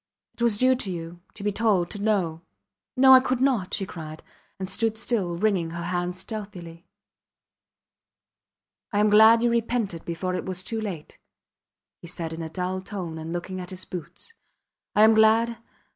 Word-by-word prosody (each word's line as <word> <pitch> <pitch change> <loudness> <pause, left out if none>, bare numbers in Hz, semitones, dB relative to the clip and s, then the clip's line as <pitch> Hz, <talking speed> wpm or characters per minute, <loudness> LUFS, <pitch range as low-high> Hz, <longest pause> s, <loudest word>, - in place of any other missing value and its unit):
It - - -14
was 235 -3 +2
due 255 +3 +4
to 210 - -4
you 170 -1 -6
to 200 - -9
be 205 - +1
told 200 -5 +1
to 205 - -6
know. 185 -7 0 0.6
No! 265 0 +8
I 260 - +10
could 255 -1 -1
not! 250 -8 +1
she 195 - -3
cried, 155 -4 -9 0.3
and 190 - -4
stood 220 +3 -1
still 210 -7 -1
wringing 190 -4 +1
her 170 +1 -5
hands 175 +1 -2
stealthily. 185 -6 -8 2.0
I 205 - -1
am 210 0 +3
glad 220 +2 +7
you 240 - +3
repented 230 -7 -1
before 175 +2 -3
it 180 - -2
was 185 0 -4
too 225 +3 -3
late, 180 -8 -7 0.8
he 170 - -11
said 165 -1 -5
in 165 - -6
a 160 - -5
dull 185 +2 -3
tone 185 -5 -6
and 160 +1 -6
looking 185 +2 -4
at 180 - -8
his 185 -1 -5
boots. 180 - -9 0.6
I 210 - +6
am 220 +1 +7
glad... 220 +1 +4
190 Hz, 175 wpm, -25 LUFS, 175-220 Hz, 2.0 s, I